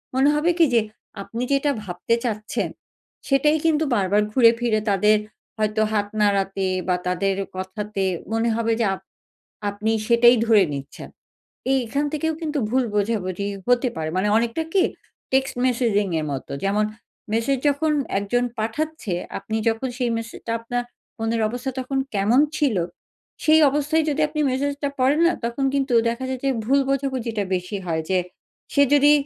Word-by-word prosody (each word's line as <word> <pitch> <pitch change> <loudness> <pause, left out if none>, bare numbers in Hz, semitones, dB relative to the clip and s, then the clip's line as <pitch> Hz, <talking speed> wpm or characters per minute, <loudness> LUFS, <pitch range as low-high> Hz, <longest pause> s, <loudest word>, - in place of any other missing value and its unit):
মনে 270 +2 +4
হবে 320 +4 +2
কি 335 - +7
যে 230 - +5 0.4
আপনি 230 +5 -5
যেটা 280 +1 +2
ভাবতে 185 +4 -1
চাচ্ছেন 215 -2 -2 0.6
সেটাই 300 +3 +3
কিন্তু 320 -1 +3
বারবার 200 0 +2
ঘুরে 230 -1 +6
ফিরে 230 -3 +1
তাদের 210 +2 +4 0.4
হয়তো 215 0 0
হাত 205 -1 +1
নাড়াতে 195 -1 +1 0.2
বা 180 - +3
তাদের 190 +2 0 0.2
কথাতে 195 +2 -4 0.3
মনে 225 +1 +1
হবে 230 0 0
যে, - - +3
আপ - - -7 0.7
আপনি 205 +2 -2 0.2
সেটাই 240 +1 +6
ধরে 220 -3 +5
নিচ্ছেন। 140 0 -8 0.6
এই 270 - +4
এখান 280 +6 -1
থেকেও 320 +1 0
কিন্তু 305 -2 -2
ভুল 260 +1 +2
বোঝাবুঝি 200 -2 -1 0.2
হতে 245 +1 +3
পারে। 160 -1 -2
মানে 190 +3 +1
অনেকটা 235 +7 0
কি 390 - +4 0.5
টেক্সট-মেসেজিং 245 -5 +1
এর 155 - -3
মত। 135 - -5 0.2
যেমন, 205 +2 +2 0.5
মেসেজ 230 +5 +1
যখন 300 +2 +1 0.3
একজন 240 +5 0
পাঠাচ্ছে, 230 - -2 0.2
আপনি 220 - -4
যখন 225 +4 -1
সেই 245 -2 0
মেসেজটা 230 0 -5
আপনার 245 +1 -2 0.4
মনের 225 +1 -1
অবস্থা 245 +3 -4
তখন 270 +1 -2 0.2
কেমন 210 +6 +3 0.2
ছিল, 275 -8 +1 0.7
সেই 315 0 +6
অবস্থায় 295 +3 +1
যদি 295 - -1
আপনি 305 0 -3
মেসেজ 280 +3 0
টা 285 - +1
পড়েন 275 +5 +3
না 345 - +4
তখন 235 +4 -1
কিন্তু 270 -2 0 0.2
দেখা 235 +3 -3
যায় 260 - -3
যে 275 - +3
ভুল 275 +5 +3
বোঝাবুঝিটা 260 -6 -1
বেশি 180 +3 -3
হয়। 160 -1 -1
যে 185 - +3 0.6
সে 285 - +5
যদি 290 +1 +6
235 Hz, 160 wpm, -23 LUFS, 210-275 Hz, 0.7 s, কি